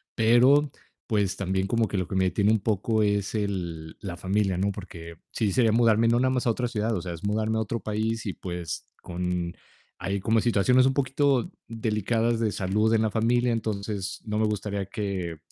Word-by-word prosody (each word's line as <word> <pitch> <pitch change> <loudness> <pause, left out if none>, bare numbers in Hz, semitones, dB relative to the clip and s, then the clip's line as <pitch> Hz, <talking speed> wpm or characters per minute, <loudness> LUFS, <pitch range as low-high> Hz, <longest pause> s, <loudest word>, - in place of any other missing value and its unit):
pero, 125 +6 +5 0.4
pues, 100 -4 +1
también 95 -1 -1
como 115 +1 +1
que 100 - -3
lo 90 -2 -1
que - - -7
me 95 0 +3
detiene 100 +3 +2
un 110 - +3
poco 110 +2 0
es 100 -1 0
el 85 -6 -3
la 95 -4 -6
familia, 95 +1 0
¿no?, 100 +2 +1
porque 85 -4 -9 0.2
sí 105 -3 0
sería 115 0 +3
mudarme 115 0 +4
no 120 +1 +3
nada 130 +1 +2
más 130 -1 -1
a - - +5
otra 125 +2 -1
ciudad, 115 -1 -1
o 90 - -2
sea, 85 -1 -5
es 80 - -10
mudarme 110 +2 0
a - - +1
otro 115 +2 -3
país 110 +1 -2
y, 95 - -2
pues, 85 -3 -5 0.2
con 90 -1 -3 0.4
hay 100 +3 -2
como 110 +3 +2
situaciones 120 +3 +4
un 135 - +3
poquito 135 -1 +1 0.2
delicadas 115 +1 0
de 110 -2 +1
salud 105 +4 +1
en 110 - +3
la 110 - +1
familia, 120 +2 +2
entonces, 100 -3 -3
no 105 -1 -2
me 110 - +3
gustaría 100 -2 -2
que 95 -5 -4
105 Hz, 200 wpm, -26 LUFS, 95-115 Hz, 0.4 s, pero